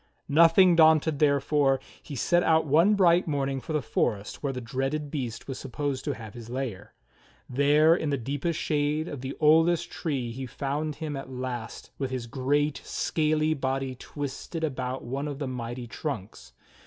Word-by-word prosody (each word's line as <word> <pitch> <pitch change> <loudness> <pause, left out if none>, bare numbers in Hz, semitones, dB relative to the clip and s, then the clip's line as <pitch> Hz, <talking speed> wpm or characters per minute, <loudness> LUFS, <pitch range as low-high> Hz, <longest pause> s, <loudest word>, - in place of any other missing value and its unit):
Nothing 170 +3 +6
daunted, 160 -2 +5
therefore, 140 -2 +3 0.2
he 145 - -8
set 175 +7 +2
out 160 -2 +3
one 165 +8 +4
bright 175 -3 +4
morning 135 -3 -1
for - - -7
the 150 -3 0
forest 105 -5 -1
where 140 - -1
the 125 - -5
dreaded 135 +5 -3
beast 125 -6 -4
was 135 - -5
supposed 135 0 -3
to 145 - 0
have 110 -2 -9
his 120 -2 -10
lair. 125 -6 -5 0.5
There 145 +5 +4
in 160 -4 -2
the 140 - +1
deepest 145 +6 -2
shade 150 +1 0
of 140 - -6
the 135 +1 -5
oldest 160 +2 +4
trees 130 -7 -3
he 135 -1 -4
found 145 +4 -3
him 155 -1 -4
at 135 -1 -6
last 125 -3 -6
with 135 -2 -1
his 130 -2 -4
great, 140 +4 0
scaly 155 0 0
body 135 -2 -2
twisted 145 +5 -6
about 130 -3 -3
one 135 +4 -3
of 145 -2 -4
the 140 -1 -3
mighty 120 -1 -5
trunks. 110 - -6
140 Hz, 170 wpm, -27 LUFS, 130-155 Hz, 0.5 s, Nothing